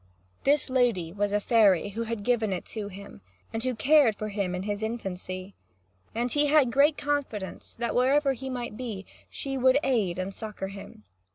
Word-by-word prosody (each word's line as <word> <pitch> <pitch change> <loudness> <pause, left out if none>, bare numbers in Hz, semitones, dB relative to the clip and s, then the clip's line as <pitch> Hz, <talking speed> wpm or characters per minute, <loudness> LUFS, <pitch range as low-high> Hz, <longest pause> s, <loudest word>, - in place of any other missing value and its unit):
This 285 +1 +3
lady 235 -10 +1
was 205 0 0
a 205 - +2
fairy, 205 -4 +4
who 225 +3 -4
had 225 -2 -4
given 225 -3 +1
it 185 - -3
to 215 -2 -4
him, 200 - -11 0.3
and 225 - -2
who 255 - 0
had 250 - -3
cared 280 -5 +5
for 215 +1 -4
him 200 -3 -2
in 180 - -3
his 205 0 -3
infancy. 190 -4 -5 0.6
And 240 +2 0
he 295 0 +3
had 290 -4 +4
great 285 +4 +4
confidence 285 -9 -3
that, 235 0 -2
wherever 275 +3 +3
he 265 +1 -6
might 245 -4 -4
be, 215 -6 -5 0.2
she 270 -1 -4
would 260 +1 +5
aid 215 -10 +1
and 185 +1 -3
succour 210 -3 -5
him. 195 - -11
225 Hz, 190 wpm, -27 LUFS, 200-255 Hz, 0.6 s, cared